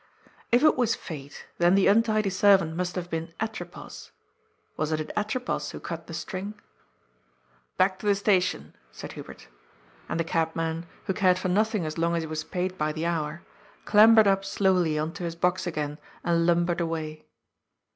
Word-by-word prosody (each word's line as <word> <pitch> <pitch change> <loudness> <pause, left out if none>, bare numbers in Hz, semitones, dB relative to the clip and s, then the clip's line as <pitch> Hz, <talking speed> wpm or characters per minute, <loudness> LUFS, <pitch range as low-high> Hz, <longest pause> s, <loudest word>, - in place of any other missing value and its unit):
If 240 +3 +4
it 310 - +6
was 235 -3 +2
fate, 145 -4 -9
then 175 +2 +5
the 195 - +4
untidy 215 -1 +3
servant 190 -4 +4
must 180 +1 -2
have 180 -1 -3
been 165 0 -5
Atropos 215 -6 -6 0.3
— - - -43
wasn't 155 0 -1
it 155 - -6
Atropos 220 +5 -2
who - - -7
cut - - -6
the - - -8
string? 200 +2 -5 0.6
" - - -39
Back 185 0 +2
to 210 - -5
the 200 - +4
station," 185 - +1 0.2
said - - -8
Hubert. - - -11 0.6
And - - -2
the - - +2
cabman, 165 0 -1 0.2
who 190 - 0
cared 185 -2 +3
for 185 0 -2
nothing 210 -1 +1
as 155 +1 -4
long 170 +1 +1
as 165 - -1
he - - -5
was 155 0 -3
paid 185 +2 -3
by 155 0 +1
the 155 +2 -3
hour, 165 -1 -2 0.4
clambered 220 +1 +7
up 195 -1 +3
slowly 185 -5 +1
on 155 +1 -1
to 185 - -7
his 165 -1 -3
box 180 +2 0
again 150 -2 -3 0.2
and 170 -1 +2
lumbered 175 0 +2
away. 155 -2 -4
175 Hz, 180 wpm, -27 LUFS, 160-195 Hz, 0.6 s, clambered